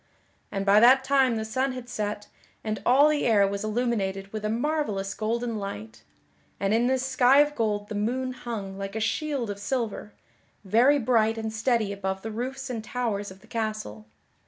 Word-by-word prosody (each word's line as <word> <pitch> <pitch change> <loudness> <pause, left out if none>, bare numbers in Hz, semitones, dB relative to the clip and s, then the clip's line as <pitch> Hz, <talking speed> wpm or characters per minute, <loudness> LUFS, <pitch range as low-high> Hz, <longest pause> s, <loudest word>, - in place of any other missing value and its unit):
And 195 0 -2
by 200 +1 +6
that 255 +4 +6
time 265 -3 +3
the 220 0 -2
sun 260 +4 -1
had 255 -1 -8
set 210 -3 -4 0.4
and 215 -1 -3
all 275 +4 +6
the 305 -1 +1
air 205 -4 +4
was 200 +1 -3
illuminated 210 -4 -2
with 215 -1 -4
a 215 - -1
marvellous 230 -6 -1
golden 230 +1 -2
light; 110 - -7 0.6
and 195 +1 +1
in 235 +2 +3
this 260 0 +1
sky 265 0 +4
of 295 0 +4
gold 210 -5 -1
the - - -6
moon 250 +5 -1
hung 205 -6 -6
like 195 +1 -5
a - - -1
shield 270 0 -1
of 200 - -7
silver, 220 -2 -3 0.5
very 240 +9 +4
bright 225 -3 +2
and 220 -1 -4
steady 220 -2 0
above 190 -1 -4
the 225 - -4
roofs 260 +4 -4
and 235 -4 -4
towers 220 -4 -2
of 190 0 -14
the - - -19
castle. 215 - -4
220 Hz, 185 wpm, -26 LUFS, 205-255 Hz, 0.6 s, by